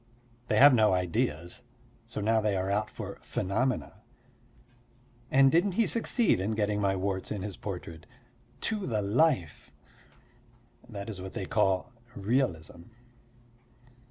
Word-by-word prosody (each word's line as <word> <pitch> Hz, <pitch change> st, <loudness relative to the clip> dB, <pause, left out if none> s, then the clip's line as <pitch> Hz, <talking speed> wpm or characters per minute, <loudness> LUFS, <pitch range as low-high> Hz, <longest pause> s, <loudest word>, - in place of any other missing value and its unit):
They -, -, +1 dB
have 145 Hz, 0 st, +8 dB
no 110 Hz, -4 st, +4 dB
ideas, 85 Hz, -2 st, -1 dB, 0.5 s
so 105 Hz, -, -5 dB
now 110 Hz, +1 st, +2 dB
they 105 Hz, -2 st, 0 dB
are 95 Hz, +1 st, -1 dB
out 105 Hz, +2 st, 0 dB
for -, -, -8 dB
phenomena. 95 Hz, -, -2 dB, 1.3 s
And 135 Hz, 0 st, +5 dB
didn't 180 Hz, +4 st, +2 dB
he 225 Hz, +4 st, +2 dB
succeed 230 Hz, -, +2 dB
in 100 Hz, +4 st, -1 dB
getting 105 Hz, -1 st, 0 dB
my 95 Hz, -1 st, +1 dB
warts 95 Hz, 0 st, -2 dB
in 100 Hz, -3 st, -3 dB
his 100 Hz, -3 st, -5 dB
portrait 85 Hz, -4 st, -7 dB, 0.5 s
to 210 Hz, -3 st, -1 dB
the 110 Hz, -4 st, -1 dB
life. 105 Hz, -, +1 dB, 1.2 s
That 100 Hz, -3 st, -7 dB
is 100 Hz, -5 st, -6 dB
what 95 Hz, 0 st, -8 dB
they -, -, -4 dB
call 95 Hz, +5 st, +1 dB, 0.2 s
realism. 95 Hz, -7 st, -1 dB
105 Hz, 130 wpm, -29 LUFS, 95-125 Hz, 1.3 s, have